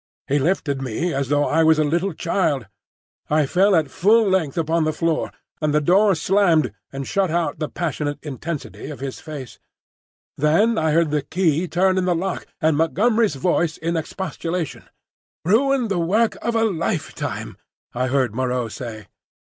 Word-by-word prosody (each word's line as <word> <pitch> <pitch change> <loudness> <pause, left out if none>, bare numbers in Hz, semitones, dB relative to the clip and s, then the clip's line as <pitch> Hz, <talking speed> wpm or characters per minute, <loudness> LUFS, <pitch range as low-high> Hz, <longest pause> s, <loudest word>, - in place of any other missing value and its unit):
He 145 +2 +2
lifted 140 -3 0
me 135 +7 -2
as 135 -1 -2
though 145 0 +2
I 160 +1 +2
was 160 0 +5
a 155 - +3
little 170 +5 0
child. 160 - 0 0.6
I 150 0 +3
fell 190 +7 +3
at 155 -5 +1
full 215 +8 +4
length 180 -7 0
upon 165 0 +1
the 155 0 0
floor, 165 -1 0 0.3
and 150 -1 +1
the - - +5
door 190 +6 +4
slammed 165 - +2 0.2
and 135 0 -5
shut 195 -2 +1
out 170 +1 -1
the 155 - -2
passionate 150 -3 -3
intensity 150 +2 -6
of 150 - -8
his 135 -1 -5
face. 145 -6 -9 0.8
Then 170 +11 +3
I 160 - +1
heard 160 0 +2
the 150 -1 +1
key 165 +2 0
turn 185 +2 +2
in 180 - 0
the 180 -1 +2
lock, 185 +2 -3
and 160 -1 +2
Montgomery's 210 +4 +2
voice 165 +2 0
in 170 +1 -2
expostulation. 165 0 -4 0.6
"Ruin 255 +6 +3
the 195 -4 -1
work 210 +7 +2
of 235 - -1
a 225 - +3
lifetime," 200 -7 -3 0.4
I 125 +1 -1
heard 130 -4 +1
Moreau 125 -1 -1
say. 110 -2 -7
160 Hz, 170 wpm, -22 LUFS, 145-185 Hz, 0.8 s, was